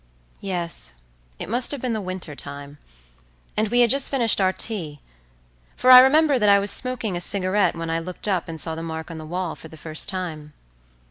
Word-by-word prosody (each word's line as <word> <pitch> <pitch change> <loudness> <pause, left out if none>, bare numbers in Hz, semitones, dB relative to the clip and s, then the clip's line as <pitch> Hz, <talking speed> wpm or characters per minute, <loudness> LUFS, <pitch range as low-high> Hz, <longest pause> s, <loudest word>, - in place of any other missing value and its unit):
Yes, 170 - -2 0.4
it - - -7
must 240 +5 +2
have 285 - -4
been 245 -1 -3
the 220 - -3
winter 185 -4 -6
time, 145 +1 -9 0.8
and 215 +1 0
we 245 +3 +2
had 235 - +3
just 275 0 +3
finished 235 -7 +1
our 185 -1 +3
tea, 170 -9 -2 0.8
for 255 - +3
I 250 - +12
remember 280 +1 +4
that 210 -2 +3
I 200 - +6
was 200 0 +2
smoking 240 -6 0
a 175 - -3
cigarette 195 +2 +2
when 165 -1 -5
I 165 - -1
looked 180 +4 -6
up 190 -4 -1
and 160 -1 -7
saw 160 - -2
the 160 - -6
mark 160 0 -7
on 165 - -8
the 155 - -9
wall 180 0 -4
for - - -12
the 160 - -14
first 155 0 -2
time. 160 -5 -6
185 Hz, 210 wpm, -22 LUFS, 160-225 Hz, 0.8 s, I